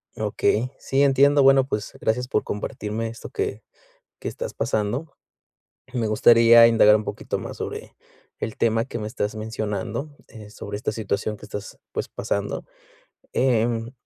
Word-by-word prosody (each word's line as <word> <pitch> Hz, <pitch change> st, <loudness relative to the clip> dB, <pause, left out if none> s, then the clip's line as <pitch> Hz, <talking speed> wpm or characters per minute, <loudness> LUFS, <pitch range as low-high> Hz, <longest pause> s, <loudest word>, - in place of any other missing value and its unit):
Okey. 120 Hz, +4 st, 0 dB
Sí, 135 Hz, +1 st, 0 dB
entiendo, 140 Hz, +1 st, +5 dB
bueno, 135 Hz, -1 st, +6 dB
pues 105 Hz, -5 st, -3 dB
gracias 125 Hz, +3 st, 0 dB
por -, -, 0 dB
compartirme 105 Hz, +2 st, -4 dB
esto 115 Hz, +2 st, -8 dB
que 415 Hz, 0 st, -3 dB, 0.6 s
que -, -, -6 dB
estás -, -, -5 dB
pasando. 120 Hz, +9 st, -2 dB, 0.8 s
Me 115 Hz, -3 st, 0 dB
gustaría 115 Hz, +1 st, +7 dB
indagar 115 Hz, -2 st, +6 dB
un 110 Hz, -, -4 dB
poquito -, -, -4 dB
más -, -, -7 dB
sobre, -, -, -6 dB, 0.4 s
el 110 Hz, -, -4 dB
tema 115 Hz, 0 st, +2 dB
que 120 Hz, -, -6 dB
me 105 Hz, -, -4 dB
estás 105 Hz, -1 st, -3 dB
mencionando, 110 Hz, +5 st, -4 dB, 0.2 s
eh, 105 Hz, -2 st, -12 dB
sobre 105 Hz, -1 st, -6 dB
esta 105 Hz, -, -2 dB
situación 105 Hz, 0 st, -2 dB
que 105 Hz, -, -11 dB
estás 105 Hz, -1 st, -7 dB
pues -, -, -3 dB
pasando, -, -, -3 dB, 0.7 s
em, 115 Hz, -2 st, +1 dB
115 Hz, 150 wpm, -24 LUFS, 105-125 Hz, 0.8 s, gustaría